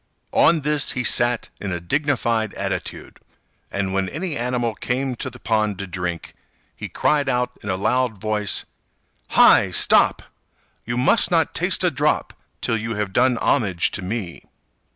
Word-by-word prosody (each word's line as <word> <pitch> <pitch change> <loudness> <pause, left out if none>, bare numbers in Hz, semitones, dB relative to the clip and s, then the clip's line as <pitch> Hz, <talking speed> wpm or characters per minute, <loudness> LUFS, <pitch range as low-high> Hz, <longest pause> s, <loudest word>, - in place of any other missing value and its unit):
On 165 -2 +4
this 150 0 +1
he 125 - -2
sat 120 -1 +2
in 100 - -4
a 85 - -2
dignified 115 - -1
attitude, - - -5 0.5
and 100 -1 -2
when 95 -1 0
any 165 +1 -4
animal 120 -2 -1
came 125 +3 -2
to 130 - -4
the 125 - -11
pond 110 -4 0
to 100 - -5
drink, 90 -2 -5 0.4
he - - -7
cried 145 -2 +1
out 125 -1 0
in 100 - -7
a 95 - 0
loud 115 +2 0
voice, 105 -1 -1 0.7
"Hi! - - +7
stop! - - +4 0.6
You 120 +1 -2
must 125 - +3
not - - +1
taste - - 0
a - - +3
drop - - 0 0.3
till 115 - 0
you 115 +1 -4
have 105 -2 -3
done 125 0 +3
homage 100 -12 +1
to - - -5
me. 95 -2 -5
115 Hz, 160 wpm, -21 LUFS, 100-125 Hz, 0.7 s, Hi